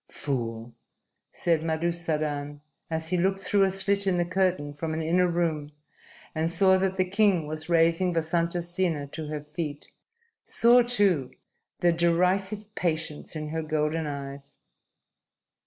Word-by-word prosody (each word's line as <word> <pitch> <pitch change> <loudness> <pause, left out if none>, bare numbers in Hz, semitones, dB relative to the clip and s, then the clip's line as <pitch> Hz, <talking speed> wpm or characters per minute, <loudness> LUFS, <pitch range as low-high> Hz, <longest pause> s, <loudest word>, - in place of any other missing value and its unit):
"Fool!" 115 -4 -4 0.6
said 165 -3 +1
Madusadan, 155 -3 -2 0.3
as 160 0 -2
he 180 - +1
looked 190 +2 +1
through 200 +1 +1
a 195 - +5
slit 200 +1 0
in 185 -2 +2
the 175 - +1
curtain 180 -5 0
from 155 +2 -4
an 160 - -2
inner 180 +3 +3
room 160 -4 -1 0.6
and 160 +1 0
saw 190 +3 +4
that 190 0 0
the 185 - +3
king 195 -4 +3
was 155 +2 -6
raising 170 +2 +3
Vasantasena 170 -2 -1
to 160 -2 -6
her 150 -1 -5
feet; 150 -4 -5 0.5
saw, 240 +2 +5
too, 200 - +2 0.5
the 175 - +5
derisive 185 +5 +1
patience 160 -4 -3
in 155 -1 -4
her 160 +1 -2
golden 155 0 -1
eyes. 140 -1 -7
165 Hz, 140 wpm, -27 LUFS, 155-185 Hz, 0.6 s, a